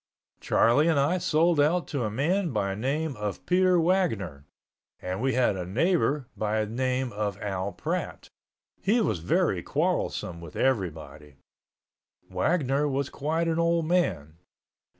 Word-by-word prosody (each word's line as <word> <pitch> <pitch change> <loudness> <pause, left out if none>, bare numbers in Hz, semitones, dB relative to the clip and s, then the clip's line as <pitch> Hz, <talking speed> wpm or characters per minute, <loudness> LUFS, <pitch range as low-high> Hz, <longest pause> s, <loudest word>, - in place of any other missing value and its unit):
Charlie 145 +7 +3
and 160 -4 +3
I 155 +7 +2
sold 165 0 +2
out 165 +4 +2
to 135 -6 -2
a - - -1
man 165 - 0
by 100 -6 -1
name 140 +7 -2
of 105 -1 -5
Peter 185 0 +3
Wagner, 110 - 0 0.5
and 90 +3 -4
we 135 0 +1
had 125 -5 +2
a 90 - -4
neighbor 140 - +1
by 110 0 0
name 130 +3 -2
of 105 -1 -3
Al 100 -2 -3
Pratt. - - -4 0.5
He 215 +5 +2
was 110 - 0
very 80 - +1
quarrelsome 85 -2 -2
with 85 -2 -11
everybody. 80 - -2 1.0
Wagner 145 -4 +1
was 140 -1 -2
quite 160 +4 -1
an 165 0 0
old 170 -1 +2
man. 85 - 0
130 Hz, 140 wpm, -27 LUFS, 100-165 Hz, 1.0 s, Charlie